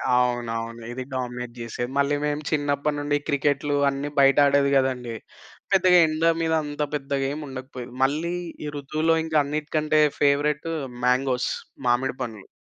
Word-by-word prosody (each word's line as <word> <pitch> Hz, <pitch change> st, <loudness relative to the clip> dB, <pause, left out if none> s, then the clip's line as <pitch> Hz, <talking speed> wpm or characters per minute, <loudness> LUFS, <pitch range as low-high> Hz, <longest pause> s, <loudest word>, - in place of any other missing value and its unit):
అవునవును. 115 Hz, -2 st, -1 dB
ఇది 130 Hz, +1 st, -5 dB
డామినేట్ 125 Hz, -1 st, -4 dB
జేసేది. 120 Hz, +1 st, -4 dB
మళ్ళీ 140 Hz, +1 st, +2 dB
మేము 150 Hz, 0 st, -1 dB
చిన్నప్పటి 145 Hz, 0 st, 0 dB
నుండి 145 Hz, 0 st, 0 dB
క్రికెటులు 145 Hz, 0 st, +1 dB
అన్ని 140 Hz, +1 st, -3 dB
బయట 135 Hz, 0 st, +5 dB
ఆడేది 140 Hz, 0 st, +3 dB
కదండీ! 125 Hz, -3 st, -1 dB, 0.6 s
పెద్దగా 185 Hz, -2 st, +6 dB
ఎండ 155 Hz, +1 st, -2 dB, 0.2 s
మీద 160 Hz, 0 st, +1 dB
అంత 145 Hz, 0 st, -3 dB
పెద్దగా 140 Hz, -1 st, -1 dB
ఏం 150 Hz, -, -4 dB
ఉండకపోయేది. 130 Hz, -2 st, -8 dB
మళ్ళీ 155 Hz, +6 st, 0 dB, 0.3 s
ఈ -, -, -3 dB
ఋతువులో 155 Hz, +4 st, +1 dB
ఇంకా 160 Hz, -1 st, 0 dB
అన్నిటికంటే 155 Hz, +1 st, 0 dB, 0.2 s
ఫేవరైట్ 150 Hz, +2 st, +2 dB, 0.3 s
మ్యాంగోస్‌ 125 Hz, 0 st, +2 dB, 0.4 s
మామిడి 125 Hz, +2 st, +1 dB
పండ్లు. 110 Hz, -5 st, -6 dB
140 Hz, 140 wpm, -24 LUFS, 125-150 Hz, 0.6 s, పెద్దగా